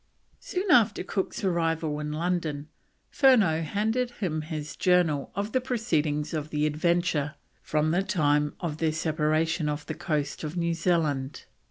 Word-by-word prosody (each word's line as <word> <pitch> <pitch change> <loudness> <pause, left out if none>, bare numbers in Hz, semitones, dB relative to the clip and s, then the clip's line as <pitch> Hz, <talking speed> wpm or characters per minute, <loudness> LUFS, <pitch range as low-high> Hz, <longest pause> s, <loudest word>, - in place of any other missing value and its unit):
Soon 390 -6 -2
after 225 -5 +4
Cook's 190 +1 -3
arrival 165 -4 0
in 150 0 -4
London, 155 -2 -2 0.4
Furneaux 220 - +4
handed 220 +9 0
him 180 -10 -3
his 155 -1 -6
Journal 175 -6 +2
of 205 +2 -2
the 255 - +1
proceedings 160 - -1
of 155 -1 -3
the 150 0 0
Adventure 155 -1 0 0.3
from 155 +1 0
the 175 +3 +2
time 150 -6 +1
of 160 -4 -3
their 160 -1 +1
separation 155 0 0
off 150 0 -4
the - - -4
coast 150 -2 -2
of 155 +3 -4
New 170 -1 +1
Zealand. 155 -5 0
160 Hz, 150 wpm, -27 LUFS, 150-185 Hz, 0.4 s, after